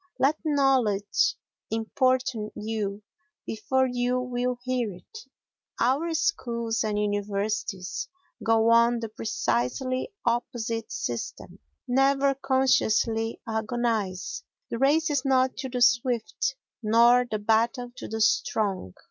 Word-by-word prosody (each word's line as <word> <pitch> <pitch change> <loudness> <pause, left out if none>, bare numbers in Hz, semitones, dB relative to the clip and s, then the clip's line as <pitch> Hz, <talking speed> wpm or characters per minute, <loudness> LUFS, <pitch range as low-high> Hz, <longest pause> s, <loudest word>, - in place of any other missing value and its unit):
Let 290 +4 +2
knowledge 265 -9 +2 0.3
importune 230 0 0
you 210 -1 -3 0.4
before 260 +4 0
you 250 0 0
will 250 0 -2
hear 250 -4 -1
it. 445 - -13 0.5
Our 290 +7 +1
schools 235 - -1
and 210 -1 -1
universities 205 - -2 0.3
go 225 0 +3
on 235 +1 +5
the 225 -1 -5
precisely 220 - -1
opposite 235 -1 -2
system. 120 -1 -5 0.3
Never 275 +2 +3
consciously 235 -4 +1
agonise; 220 -4 -2 0.3
the 230 - -2
race 300 +4 +3
is 285 -3 +1
not 260 -1 +2
to 265 0 -4
the 250 -1 +1
swift, 235 - +1 0.3
nor 235 +3 +5
the 215 - -1
battle 230 +4 +1
to - - -6
the 220 0 -4
strong. 200 - +1
235 Hz, 110 wpm, -26 LUFS, 220-260 Hz, 0.5 s, on